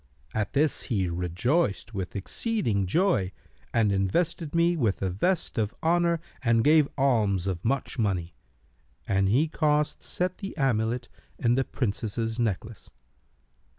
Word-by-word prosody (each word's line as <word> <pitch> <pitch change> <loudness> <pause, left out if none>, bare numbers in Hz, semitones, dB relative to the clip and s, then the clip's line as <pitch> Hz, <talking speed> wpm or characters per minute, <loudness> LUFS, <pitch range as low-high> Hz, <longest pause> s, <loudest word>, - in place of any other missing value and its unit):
At 105 -2 -2
this 150 +1 +2
he 100 -7 +1
rejoiced 100 - 0
with 95 -1 -4
exceeding 105 - -1
joy 135 - +2 0.4
and 110 -3 +2
invested 150 - 0
me 170 +1 +3
with 115 - 0
a 95 - 0
vest 165 - 0
of 105 -1 -1
honour 170 0 +2 0.2
and 115 -2 +3
gave 150 -1 +5
alms 110 -9 +2
of 90 -3 -3
much 135 +1 -1
money; 90 -5 0 0.7
and 95 0 +2
he 135 +10 +3
caused 150 -1 +1
set 180 0 -2
the 195 -3 -6
amulet 120 -3 0 0.3
in 120 -1 +2
the 135 +2 +2
Princess's 115 -1 -2
necklace. 110 -1 -3
115 Hz, 135 wpm, -27 LUFS, 100-155 Hz, 0.7 s, gave